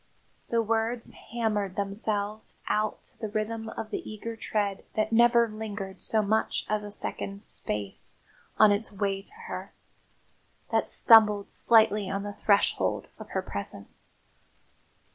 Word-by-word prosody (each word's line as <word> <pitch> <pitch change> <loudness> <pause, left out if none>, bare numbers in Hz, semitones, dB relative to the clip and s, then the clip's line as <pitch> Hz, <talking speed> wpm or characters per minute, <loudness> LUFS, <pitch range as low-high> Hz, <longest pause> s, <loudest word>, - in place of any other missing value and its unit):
The 230 -1 +2
words 225 +2 -1 0.2
hammered 210 -5 -1
themselves 205 +1 -3
out 215 0 0
to - - -10
the 220 - -3
rhythm 220 +1 -3
of 220 -1 -6
the - - -2
eager 225 +2 -6
tread 205 -3 -2
that 215 0 +1
never 235 0 +5
lingered 210 -3 -6
so 220 -1 +1
much 220 +2 0
as 215 0 0
a 205 - -6
second's 200 0 -4
space 105 -2 -3 0.4
on 215 -1 +7
its 205 +2 0
way 195 -1 -1
to 205 - -9
her, - - -6 1.0
that - - +1
stumbled 210 -3 +6
slightly 215 -3 +4
on 195 0 -2
the 205 0 -5
threshold 200 0 +1
of - - -9
her - - -2
presence. - - -7
215 Hz, 140 wpm, -28 LUFS, 200-225 Hz, 1.0 s, on